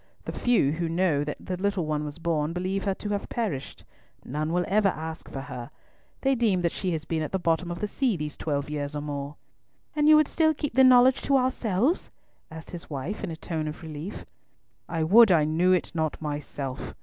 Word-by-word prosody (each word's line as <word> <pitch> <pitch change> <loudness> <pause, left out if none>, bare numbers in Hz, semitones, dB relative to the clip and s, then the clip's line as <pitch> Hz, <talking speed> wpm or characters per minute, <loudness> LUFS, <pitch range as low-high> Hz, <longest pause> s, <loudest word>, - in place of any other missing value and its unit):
The - - -3
few 235 - +2
who 165 +1 -2
know 165 -4 +2
that 150 0 -4
the 185 - -4
little 195 -2 0
one 150 -1 -1
was 150 0 -6
born 165 -2 -1
believe 185 +2 -2
her 195 -1 +1
to 205 - -6
have 205 -1 -2
perished. 205 - -3 0.4
None 155 +4 -2
will 180 +1 +1
ever 205 0 +3
ask 160 -1 -6
for 135 - -5
her. 135 -3 -7 0.5
They 270 0 +3
deem 220 -7 +2
that 170 -1 +1
she 190 - -3
has 155 -2 -3
been 160 0 -1
at 155 - -3
the 190 - +1
bottom 170 0 0
of 175 - -4
the 210 - 0
sea 240 -2 0
these 150 -1 -4
twelve 145 -2 -2
years 145 -1 -4
or 145 - -2
more." 145 0 -5 0.6
"And 300 0 +4
you 310 - +9
would 305 -1 +5
still 315 -1 +2
keep 290 -2 -3
the 265 +2 +6
knowledge 255 0 +6
to 275 - +3
ourselves?" 255 - +1 0.4
asked 160 0 -10
his 175 -2 -8
wife, 150 +7 -4
in - - -2
a 165 - -5
tone 160 -1 -4
of 155 +2 -7
relief. 160 +5 -7 0.6
"I 165 -2 -1
would 215 +6 +7
I 165 -4 +5
knew 165 +4 +2
it 185 - +1
not 160 -2 -1
myself!" 145 -3 -5
170 Hz, 220 wpm, -27 LUFS, 150-205 Hz, 0.6 s, you